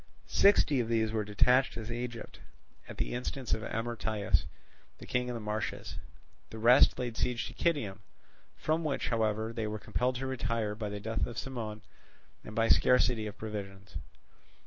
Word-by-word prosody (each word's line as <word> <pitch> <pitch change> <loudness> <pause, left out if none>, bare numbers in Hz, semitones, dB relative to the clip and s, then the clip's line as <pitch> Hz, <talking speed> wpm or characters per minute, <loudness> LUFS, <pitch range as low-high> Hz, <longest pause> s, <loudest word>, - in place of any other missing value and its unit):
Sixty 160 -8 +4
of 120 - 0
these 110 -1 +1
were 110 -1 0
detached 125 +6 +3
to 115 0 -5
Egypt 120 -1 -6 0.5
at - - -8
the - - -2
instance 125 +1 -3
of 110 - 0
Amyrtaeus, 110 -2 -1 0.5
the - - -11
king 125 0 0
in 125 - -3
the - - -3
marshes; 105 0 -4 0.5
the 110 - -8
rest 120 +4 +6
laid 120 -2 -3
siege 125 +1 -1
to - - -7
Kitium, 135 - 0 0.6
from 160 +2 0
which, 150 -3 -1
however, 110 -1 0
they 115 -2 -2
were 105 0 -3
compelled 125 +4 -1
to 130 +2 -3
retire 115 -4 -1
by 105 -1 -4
the 105 0 -5
death 110 +2 -1
of 120 - -8
Cimon 110 -5 -5 0.6
and 110 - -9
by 115 0 +3
scarcity 125 -3 +4
of 105 - -8
provisions. 100 -3 -6
115 Hz, 170 wpm, -31 LUFS, 110-125 Hz, 0.6 s, rest